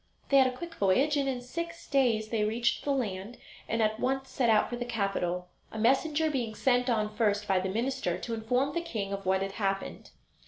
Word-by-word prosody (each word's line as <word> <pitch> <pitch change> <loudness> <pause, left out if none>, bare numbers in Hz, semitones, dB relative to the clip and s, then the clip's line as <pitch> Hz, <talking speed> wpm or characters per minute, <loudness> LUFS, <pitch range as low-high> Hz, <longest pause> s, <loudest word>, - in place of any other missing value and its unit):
They 275 - +5
had 265 -1 +6
a 255 0 -4
quick 345 +2 -7
voyage, 265 +8 +2
and 280 -1 +1
in 250 -2 -2
six 335 +6 -6
days 235 -6 +2
they 220 -2 0
reached 230 +3 0
the 285 - 0
land, 215 -4 -2 0.3
and 225 0 +1
at 215 0 0
once 265 +1 -1
set 245 -3 +1
out 215 -1 +4
for 245 - -4
the 240 - -3
capital, 195 -6 -2 0.2
a - - -7
messenger 295 +7 +2
being 235 -6 -2
sent 250 0 +2
on 215 -2 0
first 210 -2 +1
by 190 -1 +3
the 190 +1 -2
minister 255 +6 -1
to 235 - -5
inform 250 +5 0
the 340 - -1
king 210 -12 -4
of 195 -1 -5
what 190 0 +2
had 195 - -3
happened. 195 -1 -3
235 Hz, 220 wpm, -29 LUFS, 210-270 Hz, 0.3 s, had